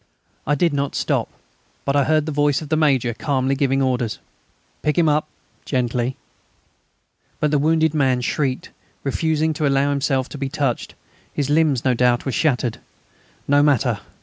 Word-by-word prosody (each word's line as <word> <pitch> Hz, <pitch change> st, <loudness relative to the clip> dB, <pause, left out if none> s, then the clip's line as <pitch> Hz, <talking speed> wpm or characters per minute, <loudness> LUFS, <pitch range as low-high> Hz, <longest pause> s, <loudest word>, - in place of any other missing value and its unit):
I 145 Hz, -, +3 dB
did 165 Hz, +1 st, +1 dB
not 140 Hz, -1 st, -2 dB
stop, -, -, 0 dB, 0.6 s
but 140 Hz, -, 0 dB
I 140 Hz, -2 st, +3 dB
heard 155 Hz, -1 st, +2 dB
the 155 Hz, -, -3 dB
voice 145 Hz, -1 st, +2 dB
of 150 Hz, -, -10 dB
the 155 Hz, -, +2 dB
Major 135 Hz, -6 st, +2 dB
calmly 135 Hz, +1 st, 0 dB
giving 135 Hz, 0 st, +1 dB
orders: 125 Hz, -4 st, -1 dB, 0.6 s
"Pick 150 Hz, +2 st, 0 dB
him 170 Hz, -2 st, +4 dB
up! 150 Hz, 0 st, +2 dB, 0.4 s
Gently...." 125 Hz, -1 st, -1 dB, 1.2 s
But 150 Hz, -, +1 dB
the 150 Hz, -, +3 dB
wounded 160 Hz, +1 st, +2 dB
man 130 Hz, -4 st, +2 dB
shrieked, 130 Hz, +1 st, -2 dB, 0.3 s
refusing 160 Hz, +2 st, 0 dB
to 150 Hz, -1 st, 0 dB
allow 140 Hz, +1 st, +2 dB
himself 135 Hz, -2 st, 0 dB
to 145 Hz, -, -8 dB
be 135 Hz, -1 st, -2 dB
touched; 140 Hz, -4 st, -2 dB, 0.4 s
his 145 Hz, -1 st, -2 dB
limbs, 150 Hz, -5 st, +2 dB
no 130 Hz, -, +3 dB
doubt, 125 Hz, 0 st, +2 dB
were 135 Hz, -, -1 dB
shattered. 125 Hz, -5 st, 0 dB, 0.7 s
No 145 Hz, +1 st, +4 dB
matter! 145 Hz, -5 st, +2 dB
140 Hz, 165 wpm, -21 LUFS, 130-150 Hz, 1.2 s, him